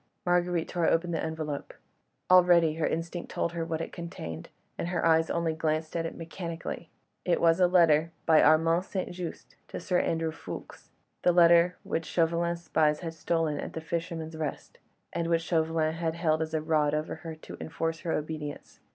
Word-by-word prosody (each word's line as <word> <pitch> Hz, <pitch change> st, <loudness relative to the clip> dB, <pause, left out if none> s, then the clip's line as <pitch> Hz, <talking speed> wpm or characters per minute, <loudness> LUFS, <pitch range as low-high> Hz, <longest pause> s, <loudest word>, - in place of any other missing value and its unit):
Marguerite 175 Hz, -1 st, +1 dB
tore 175 Hz, -2 st, 0 dB
open 170 Hz, +1 st, +2 dB
the 165 Hz, -, -1 dB
envelope. 155 Hz, -3 st, -4 dB, 0.6 s
Already 175 Hz, -3 st, +6 dB
her 165 Hz, -, +1 dB
instinct 165 Hz, +1 st, -4 dB
had -, -, -10 dB
told 170 Hz, -, 0 dB
her 170 Hz, -1 st, -3 dB
what 165 Hz, -1 st, -3 dB
it -, -, -5 dB
contained, 85 Hz, -, -7 dB, 0.3 s
and -, -, -3 dB
her 175 Hz, -1 st, -1 dB
eyes 160 Hz, 0 st, +4 dB
only 170 Hz, -1 st, 0 dB
glanced 155 Hz, 0 st, -1 dB
at 165 Hz, -1 st, 0 dB
it -, -, -8 dB
mechanically. 165 Hz, 0 st, -6 dB, 0.3 s
It 175 Hz, -, +1 dB
was 165 Hz, +1 st, +4 dB
a 180 Hz, -, +6 dB
letter 170 Hz, -4 st, +6 dB
written 165 Hz, +1 st, -8 dB
by 160 Hz, -1 st, +6 dB
Armand 165 Hz, +3 st, +4 dB
St. 190 Hz, -1 st, -3 dB
Just 175 Hz, -1 st, -7 dB
to -, -, -6 dB
Sir 180 Hz, -1 st, +1 dB
Andrew 165 Hz, -1 st, 0 dB
Ffoulkes—the 180 Hz, -, -5 dB
letter 170 Hz, 0 st, +5 dB
which 165 Hz, -, -2 dB
Chauvelin's 170 Hz, 0 st, 0 dB
spies 155 Hz, -1 st, +2 dB
had 165 Hz, -2 st, -4 dB
stolen 165 Hz, -2 st, -1 dB
at -, -, -5 dB
"The -, -, -4 dB
Fisherman's 165 Hz, -1 st, -4 dB
Rest," 155 Hz, -3 st, -5 dB, 0.3 s
and 170 Hz, -, -1 dB
which 165 Hz, -1 st, +1 dB
Chauvelin 160 Hz, -1 st, +1 dB
had 165 Hz, -1 st, -2 dB
held 160 Hz, -2 st, +1 dB
as 160 Hz, 0 st, -2 dB
a 155 Hz, -, 0 dB
rod 150 Hz, -2 st, +2 dB
over 155 Hz, +1 st, -3 dB
her 160 Hz, 0 st, -7 dB
to 155 Hz, -, -11 dB
enforce 165 Hz, 0 st, -3 dB
her 170 Hz, -, -3 dB
obedience. 150 Hz, -1 st, -5 dB
165 Hz, 185 wpm, -29 LUFS, 160-170 Hz, 0.6 s, Already